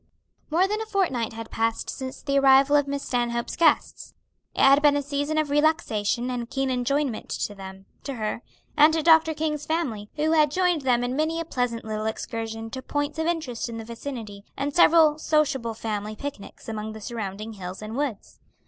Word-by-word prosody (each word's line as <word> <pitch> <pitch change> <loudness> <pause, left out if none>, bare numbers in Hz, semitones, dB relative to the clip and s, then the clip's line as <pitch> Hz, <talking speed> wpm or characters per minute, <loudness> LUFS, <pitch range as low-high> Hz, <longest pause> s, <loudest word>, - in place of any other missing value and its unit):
More 345 +5 +3
than 425 +2 -2
a 445 - -5
fortnight 325 - 0
had 225 0 -8
passed 225 0 -1
since 260 -1 -6
the 275 -1 +2
arrival 275 +1 +6
of 290 -1 +3
Miss 280 0 -3
Stanhope's 235 -1 -1
guests. 330 -1 +1 0.4
It - - 0
had 275 +2 +7
been 290 -1 +5
a - - 0
season 285 +2 -2
of 305 -2 0
relaxation 255 -6 +1
and 240 -2 -4
keen 270 -1 -1
enjoyment 255 0 -1
to 205 - -3
them, 195 -1 -10 0.2
to 275 -1 -4
her, 215 0 -3 0.3
and 305 0 +7
to 320 - 0
Dr. 320 -1 +5
King's 300 -1 -2
family, 245 -11 -2
who 310 +1 +1
had 305 -2 +4
joined 355 0 +1
them 245 -2 +2
in 245 +1 -2
many 315 +3 0
a 330 - -3
pleasant 245 -7 -2
little 215 0 -3
excursion 225 0 -5
to 260 - -5
points 290 +3 -3
of 320 - 0
interest 290 -9 -2
in 230 - -6
the 225 - -7
vicinity, 230 -4 -7
and 285 +1 -2
several 320 -3 +6
sociable 270 -8 +1
family 215 -1 -4
picnics 270 -4 -8
among 220 -1 -4
the 220 - -9
surrounding 215 -1 -5
hills 185 0 -7
and 215 +2 -6
woods. 270 -7 -4
265 Hz, 195 wpm, -25 LUFS, 225-300 Hz, 0.4 s, had